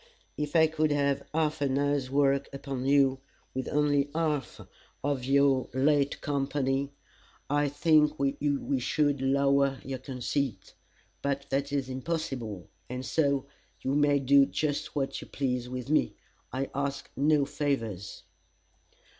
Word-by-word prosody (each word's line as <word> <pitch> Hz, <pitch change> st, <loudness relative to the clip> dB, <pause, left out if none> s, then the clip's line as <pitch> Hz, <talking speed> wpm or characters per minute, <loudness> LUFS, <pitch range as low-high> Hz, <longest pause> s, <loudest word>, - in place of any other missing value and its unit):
If 150 Hz, 0 st, -4 dB
I 160 Hz, -1 st, +7 dB
could 155 Hz, -1 st, 0 dB
have 140 Hz, -1 st, 0 dB
half 155 Hz, -1 st, 0 dB
an 135 Hz, -1 st, +1 dB
hour's 145 Hz, -2 st, 0 dB
work 140 Hz, 0 st, +2 dB
upon 135 Hz, -2 st, -4 dB
you, 135 Hz, -1 st, +4 dB, 0.3 s
with 130 Hz, 0 st, -3 dB
only 145 Hz, -1 st, +2 dB
half 155 Hz, -5 st, -1 dB, 0.4 s
of 140 Hz, -2 st, -1 dB
our 140 Hz, -2 st, +4 dB
late 140 Hz, +1 st, +2 dB
company, 140 Hz, -1 st, -1 dB, 0.6 s
I 145 Hz, 0 st, +2 dB
think 150 Hz, 0 st, +3 dB
we 140 Hz, 0 st, 0 dB
should 145 Hz, +2 st, +1 dB
lower 140 Hz, 0 st, +2 dB
your 130 Hz, -1 st, -4 dB
conceit. 130 Hz, -1 st, -3 dB, 0.5 s
But 140 Hz, 0 st, -1 dB
that 140 Hz, +1 st, 0 dB
is 140 Hz, -2 st, -1 dB
impossible, 130 Hz, -, -4 dB, 0.2 s
and 125 Hz, +1 st, -5 dB
so 140 Hz, +1 st, +1 dB, 0.4 s
you 135 Hz, -, -1 dB
may 145 Hz, 0 st, +4 dB
do 140 Hz, 0 st, +5 dB
just 150 Hz, 0 st, -2 dB
what 135 Hz, -2 st, -2 dB
you -, -, -10 dB
please 125 Hz, -3 st, -2 dB
with 125 Hz, -1 st, -5 dB
me. 155 Hz, +2 st, +2 dB, 0.4 s
I 135 Hz, +2 st, -3 dB
ask 140 Hz, 0 st, -3 dB
no 145 Hz, 0 st, +3 dB
favors." 115 Hz, -11 st, -3 dB
140 Hz, 135 wpm, -29 LUFS, 135-145 Hz, 0.6 s, I